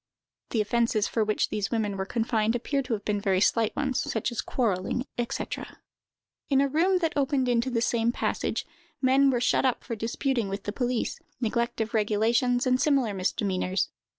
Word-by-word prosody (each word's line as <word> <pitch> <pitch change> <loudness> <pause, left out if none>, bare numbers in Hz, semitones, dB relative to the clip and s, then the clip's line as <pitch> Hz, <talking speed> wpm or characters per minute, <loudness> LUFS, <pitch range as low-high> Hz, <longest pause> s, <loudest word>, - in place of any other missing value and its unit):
The 225 - +1
offences 220 -1 +1
for 225 - 0
which 215 0 0
these 205 -2 -2
women 215 -4 -1
were 190 0 -3
confined 225 0 0
appear 275 +3 -1
to 250 -3 -3
have 205 -2 -4
been 205 -1 0
very 190 -2 +2
slight 220 +2 +2
ones, 270 -3 0
such 220 +2 -2
as 240 - -2
quarrelling, 225 +1 -1
&c. 240 - -2 1.0
In 275 -2 +4
a 280 - +3
room 340 +7 +2
that 330 -3 0
opened 275 -2 +1
into 240 +1 +1
the 235 -2 0
same 235 -1 +1
passage, - - -2 0.3
men 270 +1 +4
were 250 -2 +1
shut 245 - +2
up 255 -2 +1
for 235 - -4
disputing 235 0 -1
with 195 +1 -4
the 205 - -4
police, 245 -1 -1 0.2
neglect 235 -1 -1
of 220 - -3
regulations, 230 +4 +2
and 255 0 +2
similar 270 -8 +2
misdemeanors. 185 0 -1
235 Hz, 180 wpm, -27 LUFS, 210-255 Hz, 1.0 s, In